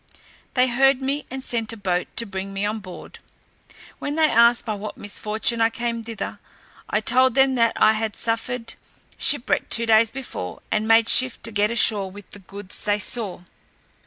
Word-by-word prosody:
They 255 0 +4
heard 265 +2 +3
me, 275 +2 -3
and 265 +1 -6
sent 230 -3 -2
a - - -9
boat 180 -3 -1
to 230 - +1
bring 195 -1 -6
me 195 +1 -2
on 215 +1 -2
board, 185 -3 -11 0.8
when 290 - -4
they 320 0 +4
asked 235 -1 +4
by 220 - -2
what 210 +1 -7
misfortune 215 +3 -2
I 225 - +4
came 235 0 -4
thither; 225 -3 -6 0.5
I 210 - 0
told 255 +3 +3
them 270 -1 +4
that 230 -2 +2
I 215 - +4
had 220 -1 -3
suffered 230 +1 -3 0.5
shipwreck 285 -4 +2
two 230 - +2
days 225 0 +4
before, 225 - -7
and 215 0 0
made 225 0 +5
shift 255 0 +4
to 230 - 0
get 205 0 +1
ashore 215 -4 +1
with 200 +1 -14
the 205 - -11
goods 200 +1 -5
they 205 0 +1
saw. 210 -3 -4
225 Hz, 185 wpm, -22 LUFS, 205-245 Hz, 0.8 s, made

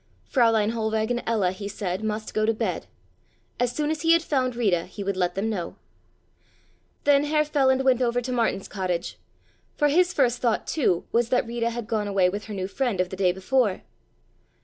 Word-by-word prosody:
Fräulein 225 -4 +3
Hohlweg 220 0 -1
and 240 0 0
Ella, 210 -6 +1
he 200 +2 -6
said, 195 -1 -4
must 215 0 -3
go 215 - +1
to 225 +1 +2
bed. - - -3 0.7
As 245 -1 +1
soon 300 +3 -1
as 310 -2 -3
he 330 0 +5
had 335 -1 +3
found 255 -5 0
Rita 195 -8 +1
he 200 +2 -7
would 200 0 -1
let 180 -1 0
them 195 +3 -1
know. 175 -5 -4 1.3
Then 285 0 +4
Herr 305 0 +2
Feland 265 -3 +2
went 260 -1 +3
over 245 0 +1
to 250 +1 -4
Martin's 230 -5 0
cottage, 185 -4 -3 0.6
for 295 -1 +2
his 350 +4 +3
first 250 -6 +1
thought, 235 -3 0
too, 215 - 0
was 235 0 +1
that 250 -1 +2
Rita 235 0 -1
had 235 -1 -5
gone 215 -2 -1
away 195 -2 +3
with 205 +3 -5
her 215 - -7
new 185 -1 -3
friend 230 -1 -2
of 185 -1 +1
the 190 - -6
day 185 -1 +2
before. 200 +3 0
225 Hz, 200 wpm, -25 LUFS, 195-255 Hz, 1.3 s, he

